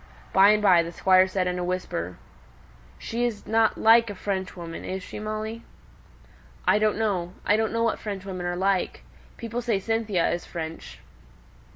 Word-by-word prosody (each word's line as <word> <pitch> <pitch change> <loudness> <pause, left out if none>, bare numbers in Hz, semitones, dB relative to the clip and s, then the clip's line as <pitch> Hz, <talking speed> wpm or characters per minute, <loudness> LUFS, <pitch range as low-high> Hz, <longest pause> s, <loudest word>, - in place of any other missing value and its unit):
By 195 +1 +7
and 210 0 +3
by 180 -4 +6
the 170 0 -5
Squire 185 +2 +4
said 185 -1 -1
in 180 0 -2
a - - -2
whisper, 175 - -3 0.8
"She's 235 -2 -3
not 220 0 +2
like 230 0 +5
a 205 - -6
Frenchwoman, 185 -4 -5
is 190 0 -4
she, - - -8
Molly?" 215 +1 -4 1.1
"I 210 - +5
don't 215 -1 +1
know. 185 -5 -1
I 205 - +4
don't 220 0 0
know 230 0 0
what 230 - 0
Frenchwomen 190 -3 -5
are 175 - -2
like. 190 0 0 0.3
People 235 +1 -4
say 230 -4 0
Cynthia 215 -3 0
is 175 - -2
French." 160 -1 -7
195 Hz, 165 wpm, -25 LUFS, 180-220 Hz, 1.1 s, By